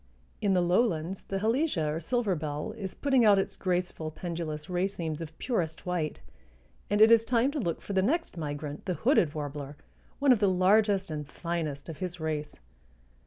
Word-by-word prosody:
In 195 Hz, -2 st, +2 dB
the 180 Hz, -, +4 dB
lowlands 180 Hz, -2 st, +1 dB
the 195 Hz, -, -2 dB
Halesia 225 Hz, -, +1 dB
or 160 Hz, -, -2 dB
silver 220 Hz, +3 st, 0 dB
bell 150 Hz, -1 st, -3 dB
is 195 Hz, -4 st, -6 dB
putting 270 Hz, -4 st, +3 dB
out 205 Hz, -2 st, +6 dB
its 195 Hz, -, -1 dB
graceful 180 Hz, -3 st, -2 dB
pendulous 160 Hz, -2 st, -5 dB
racemes 175 Hz, -3 st, -2 dB
of 160 Hz, -1 st, -8 dB
purest 175 Hz, -11 st, -2 dB
white, 175 Hz, -4 st, -2 dB, 0.7 s
and 205 Hz, -, +1 dB
it 220 Hz, +1 st, +8 dB
is 230 Hz, -1 st, +7 dB
time 240 Hz, +3 st, +2 dB
to 295 Hz, -, -3 dB
look 170 Hz, -9 st, -2 dB
for 200 Hz, -, -5 dB
the 190 Hz, -, +3 dB
next 320 Hz, -, 0 dB
migrant, 150 Hz, -2 st, -5 dB
the 180 Hz, -, 0 dB
hooded 185 Hz, -, +2 dB
warbler, 145 Hz, -1 st, -5 dB, 0.4 s
one 280 Hz, -1 st, +4 dB
of 245 Hz, -, +5 dB
the 200 Hz, -2 st, +4 dB
largest 195 Hz, 0 st, +3 dB
and 150 Hz, -2 st, -5 dB
finest 160 Hz, -5 st, -4 dB
of 165 Hz, -3 st, -7 dB
his 180 Hz, -1 st, -4 dB
race. 155 Hz, -1 st, -3 dB
180 Hz, 180 wpm, -29 LUFS, 155-210 Hz, 0.7 s, it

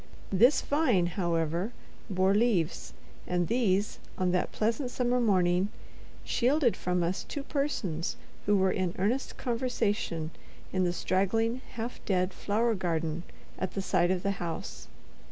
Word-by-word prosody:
This 235 Hz, +9 st, +5 dB
vine, 270 Hz, -, +3 dB
however, 170 Hz, +2 st, -1 dB, 0.4 s
bore 190 Hz, 0 st, +3 dB
leaves, 205 Hz, -7 st, +1 dB, 0.3 s
and 175 Hz, -1 st, +1 dB
these, 210 Hz, -4 st, +1 dB, 0.2 s
on 185 Hz, -1 st, +1 dB
that 180 Hz, 0 st, 0 dB
pleasant 230 Hz, +4 st, 0 dB
summer 250 Hz, 0 st, +1 dB
morning, 185 Hz, -4 st, +3 dB, 0.5 s
shielded 255 Hz, 0 st, +2 dB
from 180 Hz, -1 st, 0 dB
us 175 Hz, +3 st, -1 dB
two 285 Hz, -, -5 dB
persons 225 Hz, -, -2 dB, 0.3 s
who 205 Hz, 0 st, +5 dB
were 190 Hz, 0 st, +3 dB
in 185 Hz, -3 st, -1 dB
earnest 225 Hz, +8 st, 0 dB
conversation 230 Hz, -9 st, -1 dB, 0.4 s
in 185 Hz, -1 st, +2 dB
the 175 Hz, -, +2 dB
straggling, 225 Hz, +7 st, +1 dB
half 235 Hz, 0 st, -5 dB
dead 185 Hz, -1 st, +1 dB
flower 225 Hz, +3 st, +1 dB
garden 165 Hz, -4 st, -1 dB, 0.4 s
at 185 Hz, -, -3 dB
the 195 Hz, -, 0 dB
side 175 Hz, -, +2 dB
of 185 Hz, -1 st, 0 dB
the 200 Hz, -, +1 dB
house. 160 Hz, -, -5 dB
195 Hz, 135 wpm, -30 LUFS, 175-235 Hz, 0.5 s, This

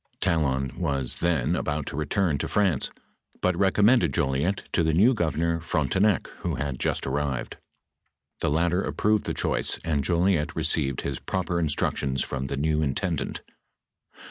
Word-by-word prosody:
}: -, -, -47 dB
Talon 70 Hz, -5 st, +1 dB
was 70 Hz, -7 st, -1 dB
then 85 Hz, -2 st, +1 dB
about 75 Hz, -4 st, -2 dB
to -, -, -5 dB
return 75 Hz, +1 st, 0 dB
to -, -, -2 dB
France, 95 Hz, -9 st, +1 dB, 0.5 s
but 90 Hz, -1 st, +1 dB
recommended 100 Hz, -, +3 dB
Jolliet 70 Hz, +9 st, 0 dB
to -, -, +3 dB
the 80 Hz, -1 st, +2 dB
new 110 Hz, +9 st, +5 dB
governor 85 Hz, -4 st, 0 dB
Frontenac, 90 Hz, +5 st, +1 dB
who -, -, -2 dB
had 70 Hz, -3 st, -3 dB
just -, -, -1 dB
arrived. 70 Hz, -3 st, -2 dB, 0.8 s
The -, -, 0 dB
latter 85 Hz, +4 st, +2 dB
approved 105 Hz, +1 st, 0 dB
the -, -, -2 dB
choice, -, -, 0 dB
and 75 Hz, -4 st, 0 dB
Jolliet 85 Hz, -1 st, +1 dB
received 75 Hz, -4 st, 0 dB
his 70 Hz, -1 st, -3 dB
proper 90 Hz, -2 st, -2 dB
instructions 70 Hz, -3 st, 0 dB
from 65 Hz, -1 st, -4 dB
the 70 Hz, -, -3 dB
new 75 Hz, +2 st, +1 dB
intendant. 80 Hz, +1 st, -2 dB
80 Hz, 150 wpm, -26 LUFS, 70-90 Hz, 0.8 s, new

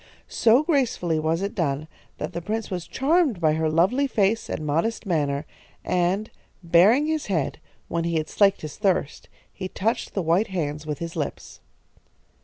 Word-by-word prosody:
So 235 Hz, +5 st, +4 dB
gracefully 245 Hz, -, +1 dB
was 160 Hz, +4 st, 0 dB
it 200 Hz, -, -2 dB
done 150 Hz, -4 st, -1 dB, 0.3 s
that 150 Hz, -, -5 dB
the 170 Hz, -, -4 dB
prince 215 Hz, +4 st, -3 dB
was 180 Hz, -2 st, -4 dB
charmed 290 Hz, -, +2 dB
by 155 Hz, -2 st, +3 dB
her 160 Hz, 0 st, 0 dB
lovely 190 Hz, -, +2 dB
face 220 Hz, -2 st, +1 dB
and 155 Hz, -, -3 dB
modest 165 Hz, +11 st, -1 dB
manner, 145 Hz, -5 st, 0 dB, 0.4 s
and, 180 Hz, +4 st, 0 dB, 0.3 s
baring 190 Hz, -, +5 dB
his 315 Hz, -1 st, -1 dB
head, 165 Hz, -9 st, -1 dB, 0.3 s
when 170 Hz, 0 st, -1 dB
he 170 Hz, 0 st, -1 dB
had 155 Hz, -1 st, 0 dB
slaked 200 Hz, -1 st, +3 dB
his 155 Hz, -2 st, -7 dB
thirst 190 Hz, -8 st, -1 dB, 0.2 s
he 185 Hz, -, -5 dB
touched 220 Hz, +5 st, -2 dB
the 195 Hz, -, 0 dB
white 170 Hz, +7 st, +2 dB
hands 155 Hz, -4 st, -3 dB
with 150 Hz, -2 st, -2 dB
his 170 Hz, +2 st, -6 dB
lips. 145 Hz, -, -5 dB
175 Hz, 170 wpm, -24 LUFS, 155-220 Hz, 0.4 s, baring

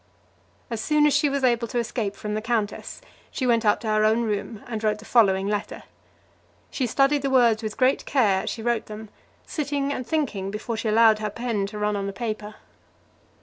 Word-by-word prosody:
As 225 Hz, -2 st, -2 dB
soon 300 Hz, +2 st, +3 dB
as 295 Hz, -, +4 dB
she 290 Hz, +1 st, +3 dB
was 275 Hz, -1 st, -2 dB
able 235 Hz, -2 st, +2 dB
to 240 Hz, -, -4 dB
escape 230 Hz, -3 st, -2 dB
from 210 Hz, 0 st, -5 dB
the 215 Hz, -, -2 dB
countess, 220 Hz, -2 st, -3 dB, 0.3 s
she 260 Hz, -, -3 dB
went 235 Hz, -2 st, +3 dB
up 210 Hz, -1 st, +3 dB
to 225 Hz, -, -5 dB
her 215 Hz, 0 st, +2 dB
own 220 Hz, +2 st, +3 dB
room, 210 Hz, 0 st, -3 dB
and 225 Hz, -2 st, -5 dB
wrote 210 Hz, -1 st, +1 dB
the 215 Hz, -, -13 dB
following 195 Hz, -5 st, +3 dB
letter. 205 Hz, 0 st, -3 dB, 0.9 s
She 255 Hz, -, -1 dB
studied 275 Hz, +4 st, +2 dB
the 275 Hz, -, -1 dB
words 240 Hz, -4 st, +4 dB
with 215 Hz, -1 st, -5 dB
great 260 Hz, 0 st, +2 dB
care 210 Hz, -9 st, +2 dB
as -, -, -4 dB
she 225 Hz, -, -5 dB
wrote 235 Hz, -1 st, 0 dB
them, 215 Hz, 0 st, -9 dB, 0.4 s
sitting 285 Hz, -2 st, -2 dB
and 255 Hz, -, -4 dB
thinking 240 Hz, -12 st, -1 dB
before 210 Hz, +3 st, -4 dB
she 225 Hz, +1 st, -3 dB
allowed 220 Hz, 0 st, +5 dB
her 215 Hz, 0 st, -2 dB
pen 215 Hz, -2 st, -2 dB
to 210 Hz, +1 st, -8 dB
run 210 Hz, 0 st, 0 dB
on 200 Hz, -1 st, -2 dB
the 200 Hz, -, -4 dB
paper. 215 Hz, -2 st, -5 dB
225 Hz, 210 wpm, -24 LUFS, 210-250 Hz, 0.9 s, allowed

